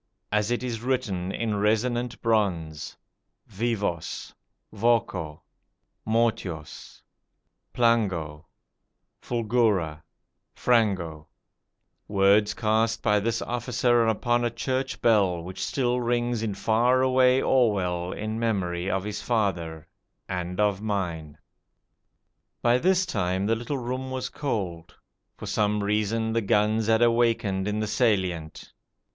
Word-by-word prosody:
As 105 0 +1
it 120 +1 -1
is 115 -3 -3
written 105 -8 -1
in 110 0 -2
resonant 120 +3 0
bronze: 90 -9 -1 0.5
VIVOS. 105 -6 -3 0.4
VOCO. 100 -9 0 0.6
MORTUOS. 110 -9 -2 0.7
PLANGO. 95 -11 0 0.7
FULGURA. 110 -10 0 0.5
FRANGO: 95 -10 +1 0.8
words 100 +1 +3
cast 115 +1 +1
by 105 -1 +3
this 115 +3 -1
officer 120 -1 +1
upon 120 +2 +1
a 120 - +1
church 130 +3 -3
bell 100 -7 +3
which 95 +2 -6
still 125 -2 0
rings 120 -1 0
in 110 -3 -2
far 120 +5 +2
away 130 0 +4
Orwell 95 -10 +1
in 110 +1 -4
memory 95 -5 -1
of 95 -1 -1
his 105 0 -4
father 85 -8 -1 0.4
and 90 0 -4
of 105 -2 +1
mine. 85 -8 -3 1.3
By 120 +1 +4
this 185 +4 +3
time 95 - -1
the 115 +2 +2
little 120 +5 -3
room 130 +1 -4
was 130 -1 -3
cold. 95 - -4 0.4
For - - -8
some 105 0 0
reason 110 +2 0
the 115 - +1
guns 105 +1 +2
had 115 +1 +4
awakened 115 -5 +2
in 105 +1 -1
the - - 0
Salient. 95 -8 -1
110 Hz, 115 wpm, -26 LUFS, 95-120 Hz, 1.3 s, away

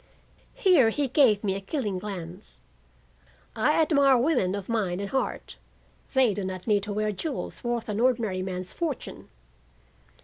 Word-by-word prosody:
Here 330 - +5
he 280 +5 -1
gave 240 -6 +4
me 195 -2 0
a 195 - -4
killing 205 -4 -3
glance. 185 -1 -8 1.0
"I - - +2
admire 280 -4 +4
women 240 - +1
of 200 -2 -6
mind 200 -6 -1
and 200 -1 -5
heart. 265 - -3 0.6
They 255 -5 +4
do 200 - -4
not 185 -1 -5
need 210 -3 +2
to 210 - -4
wear 215 +1 0
jewels 275 - -5
worth 240 -1 -2
an 210 0 -2
ordinary 230 -6 +1
man's 185 -1 -5
fortune." 320 -6 -5
215 Hz, 150 wpm, -26 LUFS, 195-260 Hz, 1.0 s, Here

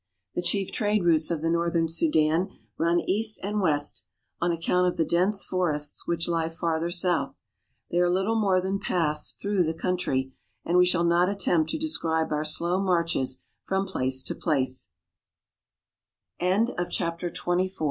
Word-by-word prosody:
The - - -1
chief 190 +2 0
trade 210 -3 0
routes 160 -2 +3
of 165 -2 -2
the 165 - +1
northern 170 -1 +1
Sudan 160 +2 +2 0.3
run 170 +1 +1
east 215 +2 +1
and 205 +1 -1
west, 145 -5 +2 0.3
on 175 - +1
account 175 +2 +1
of 180 - -2
the 165 - +2
dense 190 +4 +1
forests 150 -5 -1
which 170 -1 0
lie 165 -1 0
farther 165 0 -2
south. 175 -5 -1 0.5
They 175 - +1
are 175 0 +3
little 190 +5 +1
more 200 -4 +2
than 190 +2 -2
paths 150 -6 -1
through 200 -2 +1
the 160 0 -2
coun 180 +2 -1
try, 130 -6 -1 0.3
and 175 +1 +3
we 180 - +5
shall 180 -1 +2
not 170 +2 +3
attempt 175 -5 +1
to - - -2
describe 165 - -1
our 150 0 0
slow 170 +4 0
marches 170 -8 0 0.2
from 190 0 -1
place 130 -7 -1
170 Hz, 145 wpm, -26 LUFS, 160-185 Hz, 0.5 s, we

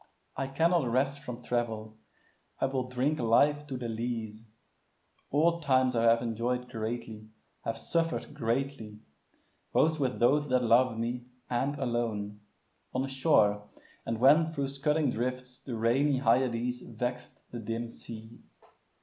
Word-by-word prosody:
I 135 - -2
cannot 165 +1 +2
rest 135 +3 +1
from 125 -2 -8
travel; 110 -2 -2 0.6
I - - +2
will 130 -1 -2
drink 130 +5 0
Life 145 +6 +3
to 135 -3 -4
the 120 -1 -4
lees. 115 -1 -4 0.8
All 165 +4 +3
times 130 -3 +3
I 115 0 +2
have 115 +1 +5
enjoy'd 120 +2 -2
Greatly, 110 -1 -5 0.4
have 115 - -2
suffer'd 165 -2 -1
greatly, 120 -4 -2 0.8
both 160 0 +3
with 130 -3 0
those 145 +4 +3
That 125 -1 +3
loved 120 0 +4
me, 120 +2 -3 0.3
and 135 +4 0
alone; 115 -5 -2 0.6
on 130 +1 0
shore, 110 -7 +2 0.3
and 115 - -2
when 155 +6 +5
Thro' 140 -3 -1
scudding 140 +1 0
drifts 125 +2 -4
the 125 - -5
rainy 130 +5 +2
Hyades 125 0 +1
Vext 125 +1 -5
the 120 - -5
dim 115 +1 -3
sea. 115 0 -10
125 Hz, 135 wpm, -30 LUFS, 115-135 Hz, 0.8 s, have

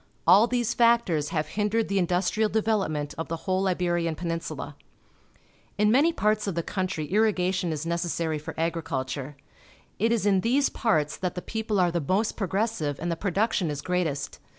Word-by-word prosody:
All 195 +7 +7
these 240 -1 0
factors 230 -11 +3
have 155 -2 -2
hindered 215 +3 0
the 200 0 +1
industrial 185 +4 +1
development 195 -10 0
of 165 - -3
the 165 - -2
whole 190 0 +1
Iberian 175 -2 0
Peninsula. 165 0 -4 1.0
In 210 +1 +3
many 290 +8 +4
parts 215 -8 0
of 195 - -2
the 170 - -1
country 185 -5 -2
irrigation 185 -5 +1
is 155 0 -3
necessary 170 -2 -1
for 155 - -8
agri 165 +1 0
culture. 135 0 -4 0.6
It 225 +3 +2
is 230 -4 +1
in 195 -2 +3
these 265 +6 +2
parts 155 - 0
that 180 -2 -3
the 180 - -4
people 220 -2 -2
are 175 -1 +3
the 170 0 -1
most 190 +9 0
progres 200 +3 0
sive 150 -9 -3
and 170 +1 -2
tlie 165 - -3
production 200 -2 0
is 145 -1 -4
great 180 -1 +1
est. 140 -2 -5
185 Hz, 180 wpm, -26 LUFS, 165-215 Hz, 1.0 s, All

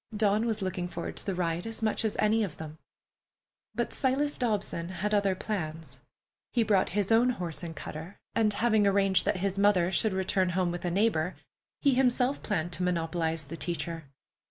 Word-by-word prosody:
Dawn 210 +2 +2
was 220 -3 0
looking 180 -1 -2
forward - - -5
to - - -5
the 195 - 0
ride 175 +1 -1
as 225 0 -5
much 220 +1 +1
as 220 - 0
any 220 +1 +3
of 185 -7 -5
them. 155 0 -8 1.0
But 240 +1 -1
Silas 285 +2 +1
Dobson 205 -8 -1
had 205 +3 -2
other 200 -2 +2
plans. 160 - -4 0.5
He 235 - +3
brought 200 -3 +2
his 205 +1 +1
own 235 +3 +5
horse 175 -9 -3
and 165 -2 -6
cutter, 160 +6 -7 0.2
and, 220 -2 +3
having 215 -1 +3
arranged 195 -1 +3
that 205 0 +1
his 195 +1 -1
mother 190 -3 +4
should 205 +3 +2
return 190 0 +1
home 180 -2 +2
with 175 +1 -5
a - - +1
neighbor, 185 -3 +1 0.5
he 280 -2 +5
himself 250 +1 +2
planned 175 -5 -2
to 155 - -1
monopolize 165 -2 -1
the 150 +4 -8
teacher. 170 -2 -4
195 Hz, 185 wpm, -29 LUFS, 170-220 Hz, 1.0 s, own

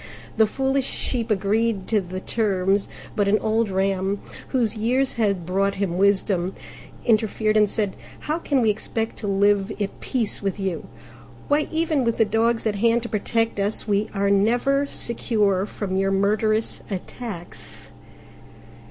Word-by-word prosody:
The 220 -1 +4
foolish 270 +3 0
Sheep 240 -3 -1
agreed 210 0 +1
to 215 -2 +3
the 185 0 -6
terms; 195 -2 0 0.3
but 205 -2 +2
an 205 +2 +4
old 220 0 +1
Ram, 195 +1 0 0.3
whose 240 -4 +1
years 250 +5 +1
had 200 -7 0
brought 195 +2 +1
him 190 -3 -1
wisdom, 195 -2 +2 0.5
interfered 215 -1 +2
and 210 -1 +4
said, 205 -3 -1 0.3
"How 310 +3 -2
can 280 -5 +1
we 220 - +4
expect 225 +2 -3
to 210 - -4
live 200 +1 +2
at 200 -1 -3
peace 235 -5 -1
with 200 0 -2
you? 190 -3 -3 0.6
Why, 295 +1 +2
even 320 -4 +1
with 230 -1 0
the 225 - +4
dogs 225 +2 +1
at 210 -2 0
hand 230 +2 +2
to 235 - -5
protect 225 +1 0
us, 205 +2 -1
we 205 0 +1
are 200 -1 +1
never 245 +8 +2
secure 210 -6 0
from 195 -2 -4
your 195 0 +2
murderous 215 +3 +1
attacks!" 180 - -8
210 Hz, 150 wpm, -23 LUFS, 195-230 Hz, 0.6 s, The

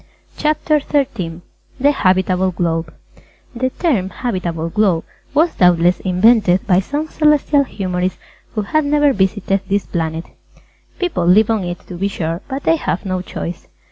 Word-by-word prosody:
CHAPTER 305 0 +1
XIII 215 - -2 0.4
THE 285 +3 +4
HABITABLE 185 -5 +1
GLOBE 165 -2 -1 0.6
The 255 +2 0
term 250 - 0
"Habitable 175 -9 -3
Globe" 190 -4 +1 0.3
was 320 +3 +3
doubtless 175 0 +4
invented 190 0 +3
by 185 -3 +4
some 290 +10 -3
Celestial 300 -2 +3
Humorist 185 -5 -2 0.4
who 215 - 0
had 310 +9 +1
never 290 -1 +3
visited 195 -1 0
this 200 0 +1
planet. 165 -1 -3 0.7
People 330 - -1
live 210 +5 +5
on 220 -4 0
it, 175 0 -5
to 180 - -8
be 200 - +1
sure, 165 -3 -3
but 270 0 -5
they 330 - +3
have 195 - -3
no 185 -1 -2
choice. 175 -1 -6
190 Hz, 145 wpm, -18 LUFS, 180-270 Hz, 0.7 s, live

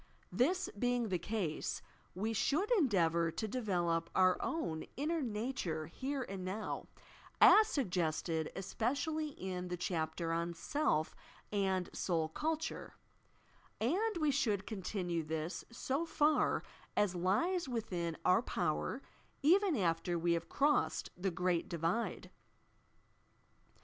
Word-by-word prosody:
This 360 +10 +2
being 245 -1 +1
the 180 -2 0
case, 175 -4 -2 0.3
we 215 +5 -1
should 305 - +1
endeavour 175 - +3
to 220 - -2
develop 175 -8 0
our 185 -1 +5
own 165 - -2
inner 315 +4 0
nature 210 - -2
here 265 - -3
and 195 -5 -6
now, 195 +4 -4 0.5
as 430 0 +8
suggested 170 - -1
especially 280 - -1
in 185 -9 -5
the 180 0 -3
chapter 165 -1 -2
on 170 +1 -1
"Self 165 - 0 0.4
and 190 -3 +1
Soul 165 -3 0
Culture," 315 - -3 0.8
and 375 - +1
we 305 -2 +3
should 215 -8 +1
con 215 -4 -5
tinue 175 -4 -2
this, 160 +3 -3
80 270 +7 -2
far 305 -1 +2 0.3
as 205 -3 +3
lies 265 - +1
within 180 -9 -2
our 180 - +5
power, - - -1 0.4
even 365 +1 +5
after 170 -2 +1
we 170 +1 +2
have 170 0 -2
crossed 290 +1 +1
the 190 +2 -1
"Great 180 +1 0
Divide." 170 +7 -1
195 Hz, 120 wpm, -35 LUFS, 170-275 Hz, 0.8 s, as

